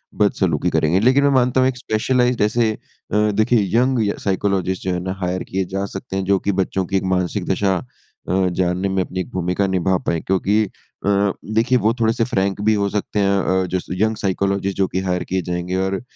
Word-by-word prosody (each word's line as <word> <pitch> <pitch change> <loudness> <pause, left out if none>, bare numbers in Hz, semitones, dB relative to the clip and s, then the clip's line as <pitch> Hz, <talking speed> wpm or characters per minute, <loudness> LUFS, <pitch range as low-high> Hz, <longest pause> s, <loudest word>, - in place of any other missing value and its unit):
बदसलूकी 95 -7 +1
करेंगे। 85 +5 +2
लेकिन 130 +5 +4
मैं 140 - +4
मानता 125 +1 +1
हूँ 130 - +4
एक 130 - -5
स्पेशलाइज़्ड 125 +2 +1
ऐसे 110 +2 +2
अ, - - -10 0.5
देखिए 110 +3 +2 0.2
यंग 130 0 +2
य 100 - -1
साइकोलॉजिस्ट 95 -1 0
जो 90 -1 -1
है 90 - -1
ना, 95 0 -2
हायर 90 0 -1
किए 95 0 -2
जा 95 0 -1
सकते 100 +1 -7
हैं 95 - -1
जो 100 0 +2
कि 100 - 0
बच्चों 95 0 -1
की 95 +1 0
एक 95 - -2
मानसिक 90 +1 -2
दशा 95 0 +1 0.5
अ, 95 0 +2
जानने 90 +2 0
में 95 -1 +1
अपनी 95 - -6
एक 90 - -4
भूमिका 90 +1 0
निभा 95 0 +1
पाएँ। 85 -1 -1
क्योंकि 100 +3 +1
अ, 100 0 -2 0.2
देखिए 120 +3 +3
वो 115 -1 +2
थोड़े-से 115 0 +2
फ्रैंक 100 -4 -1
भी 110 - +4
हो 100 -1 +1
सकते 105 +1 -2
हैं 100 0 +2 0.3
अ, - - -2
जैसे 90 +1 -3
यंग 110 0 +1
साइकोलॉजिस्ट 100 0 -1
जो 95 -1 +2
कि 95 - -2
हायर 90 0 0
किए 95 - +1
जाएँगे 90 +1 -3
और 95 0 -2
95 Hz, 210 wpm, -20 LUFS, 95-110 Hz, 0.5 s, लेकिन